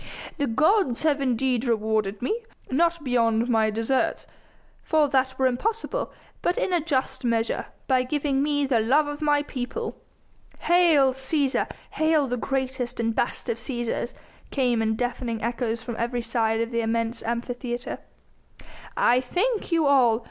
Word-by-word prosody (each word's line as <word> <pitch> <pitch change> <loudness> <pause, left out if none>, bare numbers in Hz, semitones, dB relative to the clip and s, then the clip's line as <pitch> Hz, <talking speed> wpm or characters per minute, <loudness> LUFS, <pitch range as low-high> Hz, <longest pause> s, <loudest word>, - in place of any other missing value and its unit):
"The 285 -2 0
gods 305 - +2
have 295 -3 +2
indeed 255 -1 +1
rewarded 215 -3 0
me 450 - -1 0.3
not 335 +3 +2
beyond 230 -3 +2
my 220 -3 +3
deserts, 225 +5 0 0.6
for 310 -2 +2
that 260 -1 +1
were 265 - +2
impossible 445 - -1 0.3
but 355 - 0
in 370 - 0
a 345 - +3
just 280 -6 -1
measure, 230 -1 0 0.2
by 260 -2 +3
giving 275 +1 0
me 290 0 +1
the 260 -4 +2
love 265 +8 +3
of 290 +1 -5
my 295 -1 +2
people." 290 - -4 0.7
"Hail 325 -7 +4
Cæsar! 265 +1 0 0.2
Hail 315 -2 +2
the 245 - -1
greatest 260 -1 -2
and 230 0 0
best 235 - -2
of 230 -1 -2
Cæsars!" 240 0 -3 0.3
came 245 -4 +1
in 220 0 +1
deafening 245 -1 -2
echoes 235 -1 -2
from 235 - -5
every 240 +1 -1
side 225 -1 0
of 230 +1 -2
the 235 0 0
immense 230 +1 -1
Amphitheatre. 240 +1 -4 1.0
"I 245 +1 +4
thank 395 - -1
you 330 -2 +3
all! 250 -5 +4
255 Hz, 150 wpm, -25 LUFS, 235-290 Hz, 1.0 s, Hail